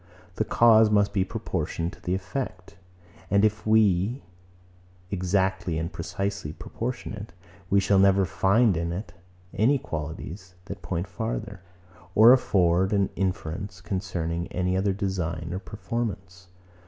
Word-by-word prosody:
The 110 - +1
cause 110 0 +5
must 100 -1 +2
be 95 -3 +2
proportioned 85 -2 -3
to - - -15
the 90 - -1
effect; 95 0 -5 0.5
and 100 +1 +4
if 110 0 -1
we 110 +3 +3 0.9
exactly 95 -2 0
and 80 +2 -3
precisely 90 -1 -3
proportion 120 +6 -5
it, 105 -4 -8 0.4
we 100 - +4
shall 100 0 +3
never 95 0 +5
find 100 +4 +3
in 85 +1 -2
it 90 0 -5 0.4
any 125 +8 +3
qualities, 85 - -6
that 100 -1 -7
point 85 +1 -3
farther, 105 -1 -4 0.5
or 115 +3 +9
afford 95 -6 +2
an 100 -2 +2
inference 95 0 -3
concerning 90 -3 -3
any 90 0 -1
other 95 +1 +1
design 90 -4 -3
or 95 - -2
performance. 95 -3 -5
95 Hz, 130 wpm, -26 LUFS, 90-105 Hz, 0.9 s, or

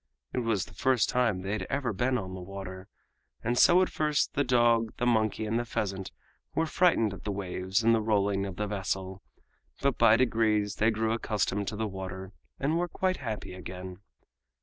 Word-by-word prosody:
It - - 0
was 115 -5 0
the - - -16
first 130 -3 +2
time 115 -7 +1
they 95 - -3
had 100 -3 -2
ever 135 -4 -1
been 125 +5 +1
on 95 -4 -5
the 95 - -6
water, 95 0 -8 0.6
and 120 +2 0
so 180 +8 +6
at - - -1
first 150 -2 0
the 145 - +2
dog, 120 -3 +3
the 125 - -1
monkey 110 -2 +1
and 110 +2 0
the - - -1
pheasant 95 -4 -3 0.4
were 165 - +2
frightened 155 - +2
at 100 - -10
the 105 - -2
waves 95 +1 -2
and 115 +1 +5
the 115 - +2
rolling 100 -2 +1
of 95 - -7
the 105 - -2
vessel, 95 -2 -3 0.6
but 140 -4 0
by 115 -1 +6
degrees 110 -4 +1
they 110 - +3
grew 110 0 0
accustomed 105 -3 -1
to 110 - -3
the 110 +1 -1
water 95 -1 -6 0.3
and 155 +5 +1
were 175 - 0
quite 185 +2 -1
happy 110 -7 -5
again. 90 0 -8
110 Hz, 195 wpm, -29 LUFS, 95-120 Hz, 0.6 s, so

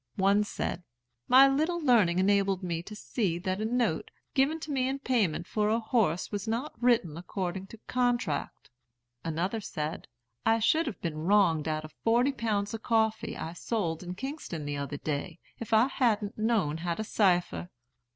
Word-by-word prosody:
One 200 +2 +3
said, 195 -3 -3 0.5
'My 265 +2 +8
little 310 +6 +1
learning 230 - +4
enabled 195 0 +2
me 170 -2 -2
to 210 +5 -9
see 200 -5 -1
that 185 +2 -2
a - - 0
note, 245 +1 0 0.2
given 285 +3 +2
to 310 - -5
me 260 -2 +1
in 270 +1 -1
payment 220 - 0
for 210 +2 0
a 225 +2 +2
horse 220 -7 0
was 205 0 -4
not 235 +7 -2
written 230 -11 +2
according 185 +1 -4
to 225 - -11
contract.' 240 - -1 0.5
Another 175 +7 -2
said, 155 -5 -4 0.4
'I 225 0 +4
should 315 +9 +2
have 240 - -5
been 160 -3 -3
wronged 175 -6 +3
out 155 0 -2
of 155 - -12
forty 240 +4 +3
pounds 215 -5 -1
of 225 - -5
coffee 220 -2 0
I 165 - -5
sold 175 -4 -2
in 180 0 -6
Kingston 265 - -5
the 145 0 -3
other 140 +1 -4
day, 155 +4 -3 0.2
if 230 - -7
I 220 +1 +6
hadn't 220 -6 0
known 215 -9 +1
how 170 +1 -2
to 220 - -3
cipher.' 180 -4 +1
205 Hz, 175 wpm, -29 LUFS, 175-235 Hz, 0.5 s, My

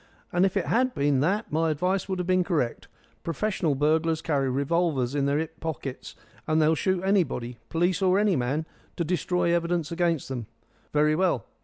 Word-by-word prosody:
And 180 +2 +4
if 190 - -3
it 190 - 0
had 255 +2 +1
been 140 -1 +2
that, 195 - 0
my 160 +2 +1
advice 180 +6 -1
would 190 - -1
have 180 - -2
been 185 0 +3
correct. 155 -10 -1 0.3
Professional 165 - -1
burglars 160 +3 +1
carry 140 -4 0
revolvers 140 -1 0
in 140 -1 +1
their 140 +1 +1
'ip 160 +1 -4
pockets, 140 -5 -5 0.3
and 155 0 +2
they'll 155 +1 +4
shoot 185 +3 0
anybody 160 - 0
policeman 180 +3 +1
or 185 - +4
any 205 -2 +3
man 135 +5 -1 0.3
to 170 - -1
destroy 180 0 0
evidence 170 -2 -1
against 170 -3 0
them. 125 -5 -5 0.4
Very 150 +1 +3
well. 170 - +1
165 Hz, 180 wpm, -26 LUFS, 145-180 Hz, 0.4 s, And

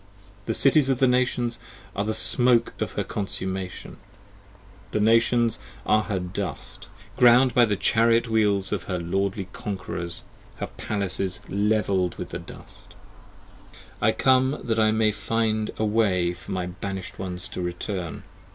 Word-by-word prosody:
The 115 - -1
Cities 135 0 +4
of 135 - +2
the 135 - +4
Nations 125 -1 +1 0.4
are 100 - 0
the 110 +1 -2
smoke 120 +1 +3
of - - -2
her - - -1
consummation, 95 -2 -4 1.0
The - - +1
Nations 115 +1 +3 0.3
are 110 - +4
her 100 -3 -2
dust, 90 +1 -6 0.3
ground 125 +1 +6
by 120 - +6
the 105 -2 0
chariot 115 +3 +3
wheels 105 -4 +2
Of 95 -5 -2
her 90 - -2
lordly 95 +2 -2
conquerors, 90 -3 -5 0.3
her - - -4
palaces 95 -3 -1
levell'd 100 -3 +1
with - - -6
the - - -5
dust. - - -13 1.0
25 - - -23
I 110 - +4
come 130 +2 +3
that 115 -2 0
I 110 0 +4
may 110 0 +2
find 110 +1 -1
a 110 - 0
way 100 -5 +2
for 90 - -11
my 90 -1 -2
banished 95 +1 -6
ones 90 -1 -3
to - - -5
return. 90 -1 -4
105 Hz, 150 wpm, -25 LUFS, 95-115 Hz, 1.0 s, ground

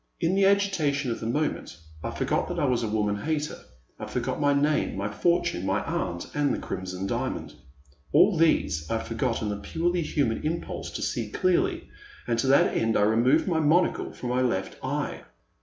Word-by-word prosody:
In 170 - +1
the 195 0 +4
agitation 165 -10 +2
of 115 - -3
the 110 - -4
moment 145 - -2 0.3
I - - -2
forgot - - -1
that - - -4
I - - +2
was 125 -3 +1
a 115 - -1
woman 105 -1 0
hater, 150 +5 -2 0.4
I - - -5
forgot 125 +3 -2
my 145 0 +4
name, 145 -5 +1
my 100 +1 -1
fortune, 170 - +1
my 95 +2 0
aunt, 170 +1 -3
and 145 -2 +1
the - - 0
Crimson 95 0 -5
Diamond - - -3 0.3
— 70 +1 -32
all 205 - +5
these 80 - +2
I 115 - +1
for - - -6
got 115 0 -1
in 105 - -1
a 105 - -3
purely 170 - -1
human 140 -7 0
impulse 165 +2 -3
to - - -3
see - - -2
clearly; 365 -1 +1 0.4
and 115 -1 0
to 130 - +1
that 135 +1 +4
end 115 0 +2
I 105 - +3
removed 120 - +3
my 165 -3 +1
monocle 160 +4 +2
from 125 - -6
my 125 +1 +1
left 95 -7 -1
eye. - - -2
135 Hz, 200 wpm, -26 LUFS, 110-165 Hz, 0.4 s, all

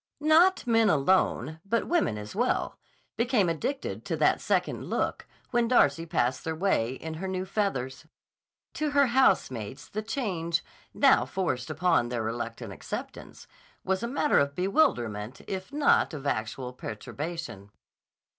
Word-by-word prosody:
Not 325 +5 +4
men 225 -2 +4
alone, 160 -2 +2
but 230 +3 0
women 335 - +1
as 105 - -8
well, 245 +4 0 0.4
became 235 -5 +2
addicted 165 - -3
to - - -2
that - - +3
second - - 0
look - - -2 0.2
when 240 -1 +2
Darcy 165 - +3
passed 125 -4 0
their 160 0 -3
way 155 -9 +1
in 160 +4 -7
her 175 +5 -5
new 185 0 -2
feathers. 160 - -2 0.7
To 305 0 -1
her 280 -1 +4
housemates 135 - +1
the 215 - -4
change, 185 -9 -2 0.3
now - - +4
forced 160 -10 -2
upon 155 -6 +2
their 120 -2 -2
reluctant 115 -1 -4
acceptance, - - -7 0.4
was 190 +1 0
a 235 - -2
matter 280 +4 +2
of 140 0 0
bewilderment 125 - 0
if 190 +4 -5
not 285 - +3
of 145 -1 -8
actual 125 0 -2
perturbation. 125 - -6
170 Hz, 140 wpm, -28 LUFS, -, 0.7 s, Not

